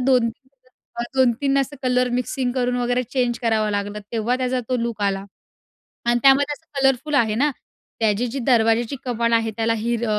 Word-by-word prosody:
2-3 255 0 +1 0.2
वेळा 240 -2 -9
2-3 260 +2 +2
असं 275 +1 -2
colour 250 0 +2
mixing 250 0 -2
करून 250 -1 0
वगैरे 245 0 0
चेंज 250 -1 -1
करावं 220 -2 +1
लागलं, 205 0 -2
तेव्हा 230 +2 0
त्याचा 255 0 -1
तो 255 - +1
लुक 235 -3 -3
आला 195 -1 0 0.8
आणि 240 0 +3
त्यामध्ये 275 +2 +5
असं 290 -2 -7
कलरफुल 270 +3 +1
आहे 225 -6 +3
ना, 285 +7 +2 0.5
त्याची 220 +2 +1
जी 245 +3 -4
दरवाजाची 230 +1 +2
कमान 235 -2 0
आहे 225 -1 +2
त्याला 225 0 +1
हिर 235 +1 -1
245 Hz, 170 wpm, -22 LUFS, 225-260 Hz, 0.8 s, त्यामध्ये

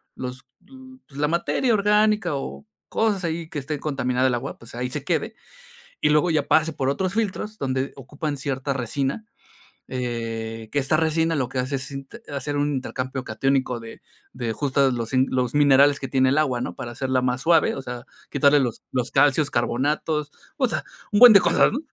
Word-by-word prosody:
los 125 0 -7 0.6
pues, 140 -1 -11
la 150 - +2
materia 175 - +1
orgánica, 210 -4 +2
o 140 - -6 0.2
cosas 205 -5 0
ahí 165 0 -3
que 150 - -4
esté 145 +2 -4
contaminada 130 -3 0
el 125 - +1
agua, 120 - -5
pues, 115 - -14
ahí 125 +1 -3
se 140 +1 -4
quede. 180 +8 -1 0.7
Y - - +3
luego 150 +3 +3
ya 150 -3 0
pase 160 +1 +3
por 135 -3 -2
otros 185 +6 0
filtros 215 0 -2
donde 130 0 -2
ocupan 145 +2 -5
cierta 135 0 -2
resina. 135 - -2 0.7
Eh, 115 -3 -4
que 145 - -2
esta 140 +3 +2
resina 160 +1 +1
lo 130 -3 -1
que 130 - -6
hace 130 +2 -1
es - - -5
sint 135 - -8 0.2
hacer 145 +1 -3
un 145 0 0
intercambio 130 0 -4
catiónico 130 +1 0
de 115 0 -11 0.3
de 120 -3 -3
justo 140 -1 +1
los 115 -1 -3 0.2
los 125 0 -1
minerales 140 0 +5
que 135 - -4
tiene 130 0 +2
el 140 - +1
agua, 130 -6 +1
¿no? - - -4
Para 120 - -6
hacerla 130 +1 -1
más 125 +1 0
suave, 165 0 +4
o 135 - -5
sea, 120 -2 -7 0.3
quitarle 145 +1 +4
los 120 -4 -2
los 125 -1 -1
calcios, 140 +1 +3
carbonatos, 145 +5 0 0.3
o 260 -4 +2
sea, - - -2 0.3
un 205 - +3
buen 245 -3 +11
de 200 - +9
cosas, - - +3
¿no? 265 - -2
140 Hz, 190 wpm, -23 LUFS, 130-155 Hz, 0.7 s, buen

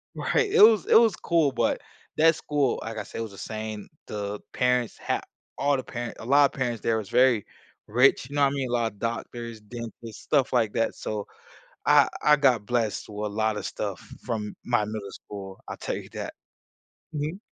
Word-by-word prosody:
Right. 435 -4 +1
It - - +5
was 220 0 +7
it - - +5
was 225 -4 +4
cool, 165 -4 +2
but 130 - 0 0.4
that 165 +1 +6
school, 145 -3 0
like 110 0 -6
I - - -3
said, - - -10
it - - -1
was 110 - -5
insane. 110 +1 -6 0.2
The 105 0 -4
parents 125 -2 +1
had - - -1 0.4
all 140 0 +2
the 130 - -4
parent 120 -1 -6
a - - -8
lotta 140 +2 +4
parents 120 -4 -1
there 115 -1 +1
was 100 - -7
very 125 -4 +4 0.4
rich, 125 +3 +3
you 145 - -7
know 145 - +3
what 135 - +1
mean? 135 -3 -2
A - - -4
lotta 115 -3 +1
doctors, 115 +1 -4
dentists, 115 0 -9
stuff 140 -4 +2
like 115 -4 +2
that, 115 - +1
so 105 -1 -4 0.6
I - - +6 0.2
I 150 0 +6
got 130 -7 +3
blessed 115 -2 -1
with 105 0 -4
lotta 110 -1 0
stuff - - -4 0.3
from 105 -2 -3
my 120 -3 +2
middle 105 -2 -5
school. 95 -2 -9
I'll - - -5
tell - - -3
you - - -8
that. - - -5 0.8
Mhm. 150 +6 -3
120 Hz, 190 wpm, -26 LUFS, 110-135 Hz, 0.8 s, was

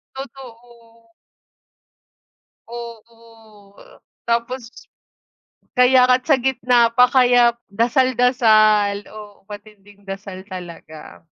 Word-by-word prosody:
Totoo. 235 -4 -14 1.6
Oo, 230 -3 -14 0.5
tapos 235 +1 -3 1.1
Kaya 250 0 +5
nga 250 0 +4
at - - -37
sa 280 - +4
gitna 245 -2 +1
pa. 250 0 +4
Kaya 245 -2 +3 0.2
dasal-dasal, 225 -4 +2
oo, 210 -1 -13
matinding 205 -1 -15
dasal 195 -1 -9
talaga. 170 -5 -12
230 Hz, 80 wpm, -19 LUFS, 205-250 Hz, 1.6 s, Kaya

